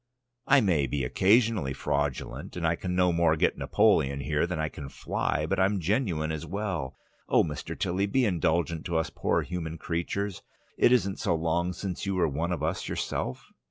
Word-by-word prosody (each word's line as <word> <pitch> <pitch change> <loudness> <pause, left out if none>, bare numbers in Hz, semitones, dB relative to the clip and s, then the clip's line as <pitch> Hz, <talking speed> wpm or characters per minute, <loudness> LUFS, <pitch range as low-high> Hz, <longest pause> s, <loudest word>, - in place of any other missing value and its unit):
I 140 -1 +6
may 80 -9 +2
be 70 +1 -2
occasionally 95 - +3
fraudulent, 70 +4 -3
and 85 - -2
I 80 +1 +2
can 90 +1 -3
no 90 -1 +3
more 85 -1 +3
get 80 - +2
Napoleon 75 -11 +2
here 75 +4 0
than 90 -2 -3
I 80 0 0
can 70 -1 -8
fly, 75 - -2
but 95 +4 -1
I'm 95 +1 +2
genuine 85 -4 0
as 80 0 -4
well. 85 -6 -3 0.3
Oh, - - +5
Mr. 75 -3 -5
Tilly, 95 +3 0
be 130 +5 +2
indulgent 85 -3 0
to 85 -2 0
us 80 - -1
poor - - 0
human 85 -2 -5
creatures! 90 +4 -3 0.3
It - - +4
isn't 100 -6 +2
so 100 -6 +1
long 85 +2 0
since 95 +1 -5
you 100 - 0
were 90 -3 +2
one 80 +5 -2
of 80 -4 -2
us 80 +4 -2
yourself." 65 - -3
85 Hz, 190 wpm, -28 LUFS, 80-95 Hz, 0.3 s, I